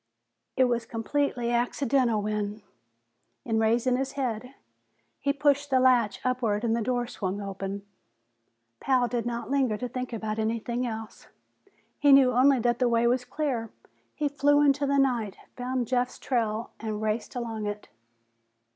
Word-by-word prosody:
It 260 - +5
was 240 -2 0
completely 240 +1 -1
accidental 240 -2 +1
when, 210 0 -3 0.8
in 225 -2 +1
raising 235 +3 +2
his 270 +1 -3
head, 250 -1 -3 0.6
he 280 - +1
pushed 285 0 +1
the 260 -1 +3
latch 245 -5 +3
upward 240 -4 0
and 230 -1 +1
the 235 - -1
door 245 +2 0
swung 200 -4 -4
open. 195 0 -5 0.9
Pal 255 -2 +2
did 240 -1 -2
not 235 +2 -4
linger 260 -6 +1
to 250 - -3
think 250 +1 -5
about 220 -1 -3
anything 230 +3 -1
else; 220 -1 -7 0.7
he 290 -1 +5
knew 270 -2 +7
only 260 +3 +5
that 240 0 +1
the 250 -2 +3
way 235 0 +2
was 250 +1 +2
clear. 250 -4 -2 0.5
He 300 - 0
flew 290 +1 +3
into 285 0 +3
the 280 0 +2
night, 240 -7 +1 0.2
found 250 -1 -2
Jeff's 250 0 0
trail 230 -3 -1
and 215 -2 -4
raced 215 +3 -2
along 225 -3 -3
it. 205 0 -5
240 Hz, 155 wpm, -27 LUFS, 220-260 Hz, 0.9 s, knew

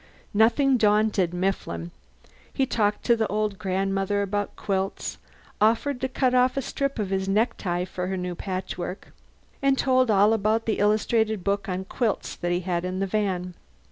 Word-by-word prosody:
Nothing 250 +5 +4
daunted 210 -4 +2
Mifflin. 175 - -2 0.6
He 270 - +1
talked 210 -5 0
to 235 - +4
the 220 -1 0
old 210 -1 -1
grandmother 195 +1 0
about 205 +1 -2
quilts; 195 -1 -3 0.4
offered 235 +5 +2
to 260 - -1
cut 255 -1 +1
off 250 +1 +3
a - - +2
strip 275 +2 -2
of 205 -3 -2
his 190 0 -1
necktie 195 -4 0
for 180 -1 -4
her 190 0 -2
new 180 0 -3
patchwork; 185 0 -5 0.5
and 275 -1 +3
told 255 -2 +3
all 205 +1 +5
about 220 +1 +1
the 220 - 0
illustrated 215 0 +2
book 200 0 -1
on 185 +1 -3
quilts 220 +1 -2
that 175 - -2
he 175 +1 0
had 175 -1 -2
in 185 0 -3
the 195 - 0
van. 185 -3 -1
205 Hz, 170 wpm, -25 LUFS, 185-225 Hz, 0.6 s, all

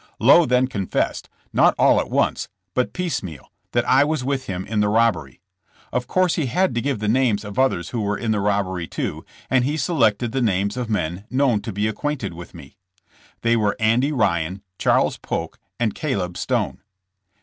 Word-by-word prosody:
Lowe 145 +8 +6
then 125 +1 +3
confessed, 100 -7 -2 0.2
not - - +4
all - - +5
at - - -3
once, - - 0 0.2
but 125 - 0
piecemeal, 125 - -4 0.2
that - - +1
I 135 +2 +5
was 150 -2 -1
with 135 0 -2
him 95 -1 -4
in 110 -1 -2
the 105 0 +2
rob 115 +1 +4
bery. 70 -4 -11 0.5
Of 125 -1 -1
course 185 +1 +2
he 155 -5 0
had 180 +5 +1
to 120 - -1
give 140 -1 -1
the 105 0 -3
names 110 -3 +2
of 100 +4 -5
others 110 -10 +1
who 120 - -3
were 105 0 -1
in 115 -2 -2
the 105 - +1
robbery 100 -4 -1
too, - - -4 0.2
and 130 -1 +2
he 145 +4 -1
selected 120 - +1
the 135 +1 -1
names 100 -2 +1
of 125 -2 -4
men 90 -2 -2
known 130 -5 +2
to 110 - -5
be 105 +2 -1
acquainted 110 - -3
with 85 +1 -11
me. - - -13 0.7
They 115 0 +3
were 105 -3 +1
Andy 115 +6 +2
Ryan, 95 - 0 0.2
Charles - - +2
Polk - - -4 0.2
and 115 -4 +1
Caleb 95 - -2
Stone. - - -2
115 Hz, 195 wpm, -22 LUFS, 100-130 Hz, 0.7 s, Lowe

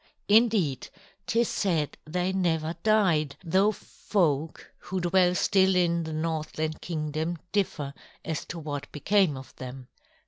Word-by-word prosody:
Indeed, 205 - +3 0.4
'tis 230 0 +2
said 165 -7 0
they 180 +4 -1
never 165 -3 0
died, 175 -9 +2
though 190 +5 +3
folk 160 -8 -2
who 185 - -2
dwell 180 0 +3
still 190 -1 +3
in 170 -2 +2
the 160 - -5
Northland 155 0 -2
Kingdom 160 +1 -3
differ 155 -8 -1 0.3
as 160 -2 -2
to 175 - -7
what 145 -2 -5
became 180 0 +2
of 130 - -11
them. 130 0 -8
170 Hz, 130 wpm, -27 LUFS, 155-190 Hz, 0.4 s, Indeed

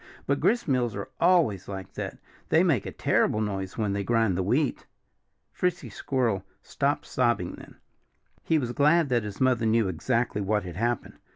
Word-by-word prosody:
But - - 0
gristmills 130 - +1
are 100 +5 -6
always 165 - +3
like 95 -2 -7
that. - - -5 0.3
They 160 - +5
make 145 - +1
a - - -4
terrible 110 - +1
noise 95 -3 -3
when 105 -3 0
they 100 0 -1
grind 115 -2 +2
the 95 - 0
wheat." 130 +10 0 0.7
Frisky 180 -1 -1
Squirrel 115 -8 -1 0.2
stopped - - -1
sobbing - - 0
then. - - -12 0.7
He 160 - +1
was 125 -5 -1
glad 150 +3 +3
that 120 -2 +2
his 105 -1 -7
mother 125 -3 +2
knew 110 -1 +3
exactly 115 +4 -1
what 105 +1 0
had 90 -3 -7
happened. 120 +3 -2
115 Hz, 170 wpm, -27 LUFS, 100-135 Hz, 0.7 s, They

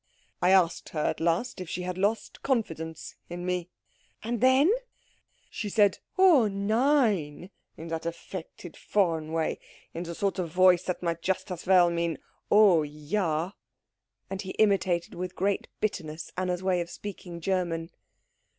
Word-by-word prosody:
"I 180 - +4
asked 185 -3 +3
her 155 - -3
at - - -1
last 170 +6 0
if 180 - -7
she 180 - -3
had 180 0 -3
lost 205 +4 -1
confidence 165 - -2 0.2
in 175 +1 -5
me." 180 -1 -2 0.5
"And 230 0 -2
then?" 260 +7 +5 0.8
"She 210 - -5
said 205 -1 +3 0.2
oh 345 - +6
nein, 205 - +1 0.3
in 165 +1 -8
her 165 - -1
affected 170 0 -7
foreign 165 -6 0
way 160 -1 -1 0.3
in 165 - -4
the 170 -1 -5
sort 195 +1 -1
of 175 -2 -2
voice 180 +1 +5
that 180 -1 -3
might 170 -1 -1
just 190 +2 -2
as 180 0 -6
well 180 -2 +6
mean 170 -2 -1 0.3
oh 205 -6 +6
ja." 155 +3 -2 0.8
And 195 0 -4
he 190 -1 -6
imitated, 190 -5 +2
with 180 +1 -5
great 200 +1 0
bitterness, 160 -6 -3
Anna's 180 0 -2
way 185 -2 +2
of 170 - -5
speaking 180 -3 -8
German. 170 -2 -1
180 Hz, 150 wpm, -28 LUFS, 170-200 Hz, 0.8 s, oh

